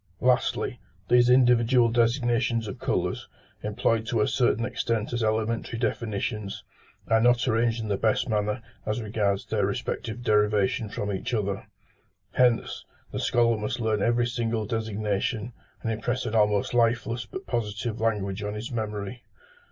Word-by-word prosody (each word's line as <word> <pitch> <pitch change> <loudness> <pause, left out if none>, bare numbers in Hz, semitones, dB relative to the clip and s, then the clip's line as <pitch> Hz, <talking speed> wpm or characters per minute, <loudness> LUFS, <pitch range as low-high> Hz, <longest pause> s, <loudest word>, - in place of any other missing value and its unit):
Lastly, - - +1 0.3
these 120 0 +5
individual 125 -1 +5
designations 115 -1 +1
of 100 - -6
colours, - - -1 0.3
employed 110 +1 0
to 115 - 0
a - - +3
certain 120 -3 +2
extent 115 -3 -2
as 120 -1 0
elementary 110 +1 -1
definitions, 105 -3 -2 0.4
are 110 0 +4
not 120 +1 +3
arranged 115 0 +1
in - - -4
the 100 -2 0
best 110 +2 +1
manner 105 -1 -1 0.2
as 110 +2 -2
regards 105 -3 -1
their - - 0
respective 120 +1 -3
derivation 105 0 +2
from 105 0 -3
each 110 +6 -2
other: 100 -1 -2 0.6
hence, 125 -2 +2 0.3
the - - -3
scholar 115 -1 +2
must 105 +3 -3
learn 110 -3 0
every 120 +2 +2
single 115 -2 -1
designation, 110 +1 -2 0.3
and 115 - 0
impress 120 +4 -2
an 110 - -3
almost 105 -1 +2
lifeless 120 -1 +1
but 190 - -7
positive 110 -1 -3
language 105 -3 0
on 105 0 -3
his 110 +4 -5
memory. 110 0 -4
115 Hz, 145 wpm, -26 LUFS, 105-120 Hz, 0.6 s, these